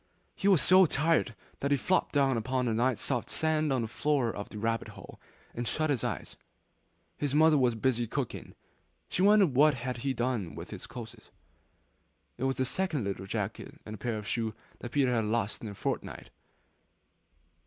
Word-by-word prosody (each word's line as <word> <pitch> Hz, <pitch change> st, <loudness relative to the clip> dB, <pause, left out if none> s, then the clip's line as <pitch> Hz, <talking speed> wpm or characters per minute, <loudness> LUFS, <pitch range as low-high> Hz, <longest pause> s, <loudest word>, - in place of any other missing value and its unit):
He 195 Hz, -, -1 dB
was 185 Hz, -9 st, +6 dB
so 185 Hz, -1 st, +7 dB
tired 150 Hz, -5 st, +1 dB, 0.2 s
that 140 Hz, -, -1 dB
he 140 Hz, -, +3 dB
flopped 185 Hz, +8 st, +1 dB
down 135 Hz, -3 st, +3 dB
upon 125 Hz, +3 st, -1 dB
the 115 Hz, -, 0 dB
nice 120 Hz, +1 st, +1 dB
soft 125 Hz, -4 st, -1 dB
sand 155 Hz, -2 st, +1 dB
on 130 Hz, -3 st, +1 dB
the -, -, -3 dB
floor 135 Hz, -1 st, 0 dB
of 100 Hz, -, -6 dB
the -, -, -9 dB
rabbit 115 Hz, +2 st, -1 dB
hole -, -, -12 dB, 0.3 s
and 120 Hz, 0 st, -4 dB
shut 155 Hz, +4 st, 0 dB
his 130 Hz, -6 st, -1 dB
eyes. -, -, -4 dB, 0.8 s
His 145 Hz, -1 st, -1 dB
mother 155 Hz, 0 st, +6 dB
was 125 Hz, -4 st, +3 dB
busy 120 Hz, 0 st, 0 dB
cooking; -, -, -4 dB, 0.5 s
she -, -, -1 dB
wondered 200 Hz, -6 st, +5 dB
what 145 Hz, +2 st, +5 dB
he 125 Hz, +1 st, -4 dB
had 130 Hz, -, -2 dB
done 120 Hz, -, -1 dB
with 85 Hz, +2 st, -8 dB
his 100 Hz, -4 st, -8 dB
clothes. 115 Hz, -4 st, -10 dB, 1.1 s
It 130 Hz, -, -1 dB
was 135 Hz, 0 st, 0 dB
the 130 Hz, -, +1 dB
second 170 Hz, -, 0 dB
little 95 Hz, -1 st, -4 dB
jacket 105 Hz, 0 st, -4 dB
and 105 Hz, -1 st, -7 dB
pair 115 Hz, 0 st, -2 dB
of 105 Hz, -1 st, -7 dB
shoes 110 Hz, -2 st, -2 dB, 0.2 s
that 120 Hz, -, -7 dB
Peter 135 Hz, -3 st, +2 dB
had 115 Hz, -2 st, +1 dB
lost 110 Hz, -1 st, -1 dB
in 110 Hz, -, -5 dB
a 100 Hz, -, -8 dB
fortnight! -, -, -4 dB
125 Hz, 185 wpm, -30 LUFS, 115-145 Hz, 1.1 s, so